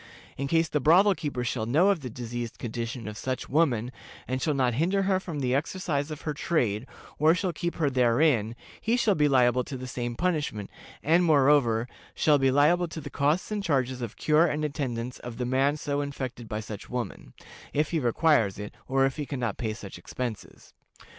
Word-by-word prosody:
In 140 - -3
case 165 +2 +2
the 150 -1 0
brothel 180 +8 +5
keeper 145 -8 -3
shall 115 -2 -2
know 160 +11 +4
of 200 -4 +2
the 130 -4 -6
diseased 120 0 -5
condition 115 0 -5
of 105 0 -6
such 130 -1 -3
woman, 130 -6 +1 0.4
and 130 +1 -2
shall 150 0 +1
not 130 -3 +2
hinder 180 - +1
her 190 -1 +2
from 165 -6 -5
the 125 -1 0
exercise 145 0 -1
of 155 -2 -7
her 150 - -3
trade, 130 -7 0 0.3
or 155 +3 +5
shall 180 -1 -1
keep 170 +2 -3
her 160 -4 +1
therein, 125 -2 +2 0.3
he 230 +2 +1
shall 220 -4 +3
be 150 -4 +3
liable 125 -2 +3
to 130 - -6
the 130 - -7
same 120 -1 -4
punishment, 150 - -2 0.3
and, 165 +4 +4
moreover, 140 -7 +4 0.3
shall 150 -2 +4
be 135 0 +3
liable 155 +6 +3
to 160 - -7
the 140 -2 -8
costs 150 +8 0
and 210 -1 -1
charges 130 -6 0
of 115 -2 -6
cure 155 +2 +4
and 150 -1 -1
attendance 125 -5 -3
of 120 -2 -8
the 125 - -2
man 135 +4 +2
so 145 -1 -2
infected 130 -5 -5
by 105 0 -3
such 105 -1 -8
woman, 120 - -5 0.4
if 150 +1 0
he 165 - +1
requires 120 - +2
it, 105 0 -7
or 135 0 +3
if 135 +2 -2
he 145 -2 -4
can 140 - -4
not 120 -5 -1
pay 110 -2 -2
such 100 -5 -9
expenses. 115 +3 -7
135 Hz, 205 wpm, -27 LUFS, 120-155 Hz, 0.4 s, brothel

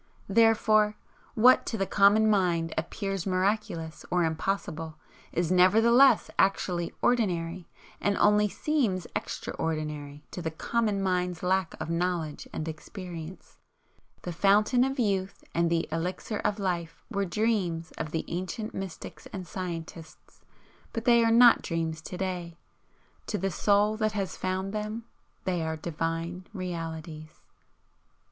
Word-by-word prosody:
Therefore, 215 -1 +4 0.4
what 250 +3 +6
to 225 - -2
the 195 - 0
common 205 +3 +5
mind 175 -6 +2
appears 195 +3 -3
miraculous 185 -4 -1
or 180 -1 +2
impossible, 160 -1 -2 0.3
is 170 0 0
nevertheless 225 +9 +5
actually 180 -3 +1
ordinary, 180 -7 0 0.3
and 205 -1 +1
only 210 0 +4
seems 230 - 0
EXTRA - - -4
ordinary 150 -2 -3
to 180 - -5
the 165 - -2
common 205 +4 -1
mind's 180 -2 -1
lack 185 -1 +1
of 155 +1 -4
knowledge 170 -3 -2
and 155 - -4
experience. 170 +1 -8 0.7
The 175 - -4
Fountain 210 +7 +4
of 270 +1 -1
Youth 195 -5 -1
and 170 0 +2
the 165 -1 0
Elixir 180 +6 -3
of 205 - 0
Life 170 -4 -3
were 200 -2 0
dreams 185 -4 -1
of 155 - -3
the 160 +1 -3
ancient 185 +5 -4
mystics 190 -4 -7
and 190 -2 -6
scientists, 170 -2 -7 0.5
but 230 0 -4
they 235 -1 +6
are 230 - +3
not 235 +1 +7
dreams 165 -1 -2
to 180 - -7
day. 180 -3 -4 0.7
To 210 - -1
the 195 -1 -1
Soul 205 +3 +2
that 215 -1 0
has 195 -3 -2
found 190 +1 -2
them 215 +2 -3 0.4
they 180 -2 -1
are 160 0 -2
Divine 165 +3 -3
Realities. 165 -3 -6
185 Hz, 135 wpm, -28 LUFS, 165-210 Hz, 0.7 s, not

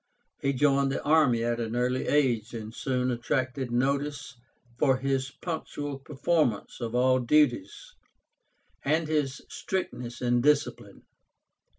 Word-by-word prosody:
He 140 - +1
joined 140 0 +2
the 135 - -3
army 145 -7 +3
at 120 0 0
an 115 0 -3
early 125 +1 0
age, 120 -6 +1
and 110 -1 -7
soon 125 0 -1
attracted 130 +1 -2
notice 140 +2 -1 0.4
for 135 -3 +3
his 135 0 -1
punctual 145 -3 -5
performance 140 -5 -1
of 115 0 -3
all 130 +1 +4
duties, 125 -6 +1 0.9
and 155 +3 +1
his 150 -3 -1
strictness 125 -10 -4
in 120 -1 +2
discipline. 145 +2 0
130 Hz, 120 wpm, -28 LUFS, 120-145 Hz, 0.9 s, all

